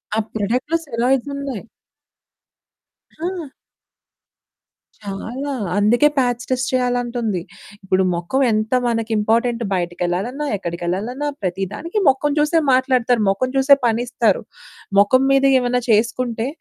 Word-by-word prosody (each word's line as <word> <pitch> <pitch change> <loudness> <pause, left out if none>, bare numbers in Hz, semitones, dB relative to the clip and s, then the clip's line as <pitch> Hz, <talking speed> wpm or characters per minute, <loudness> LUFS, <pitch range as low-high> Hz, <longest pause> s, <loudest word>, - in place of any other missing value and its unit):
ఆ - - +2
ప్రొడక్టులు 245 +10 0
సేల్ 235 -4 -2
అవుతున్నాయి. 270 -3 -2 1.5
ఆ! 340 -3 -5 1.5
చాలా, 225 +8 -5 0.3
అందుకే 230 +8 +4
పాచ్ 245 -2 +1
టెస్ట్ 255 -1 0
చేయాలంటుంది. 245 -5 -1 0.4
ఇప్పుడు 190 0 +1
మొఖం 175 +11 -1
ఎంత 215 +2 -1
మనకు 230 -1 -1
ఇంపార్టెంటు 230 +3 +1
బయటికెళ్ళాలన్నా, 180 +9 -2
ఎక్కడికెళ్ళాలన్నా, 190 +10 -3
ప్రతి 190 0 -2
దానికి 335 - -3
మొఖం 270 +2 +1
చూసే 300 +3 +3
మాట్లాడుతారు, 255 -2 +2
మొఖం 225 +7 0
చూసే 270 +1 +6
పనిస్తారు. 235 -2 +1 0.6
మొఖం 255 +6 +4
మీద 275 0 +4 0.2
ఏమైనా 245 0 0
చేసుకుంటే 230 +1 +1
240 Hz, 105 wpm, -20 LUFS, 210-265 Hz, 1.5 s, చూసే